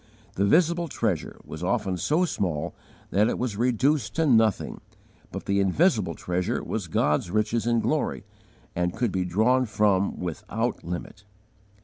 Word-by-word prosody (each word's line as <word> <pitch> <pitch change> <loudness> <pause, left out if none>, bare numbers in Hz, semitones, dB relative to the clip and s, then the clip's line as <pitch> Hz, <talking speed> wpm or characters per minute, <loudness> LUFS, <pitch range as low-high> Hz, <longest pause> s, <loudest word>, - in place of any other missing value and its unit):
The 100 - +1
visible 170 - +3
treasure 110 - -2
was 80 +1 -8
often 95 -1 0
so 150 - +1
small 85 - -2 0.4
that 105 +4 +3
it - - -1
was 120 -4 -2
reduced 125 +3 +1
to 160 - +2
nothing, 110 -7 +2 0.5
but - - -6
the 100 0 +1
invisible 100 - +2
Treasure 90 0 -2
was - - -3
God's 75 +4 +1
riches 110 +3 0
in 115 -1 +2
glory, - - -1 0.5
and 90 0 -1
could 115 -1 0
be 95 -1 -1
drawn 120 +8 +2
from 100 -2 +1
without 85 -3 -3
limit. 90 +4 -6
105 Hz, 145 wpm, -26 LUFS, 90-125 Hz, 0.5 s, visible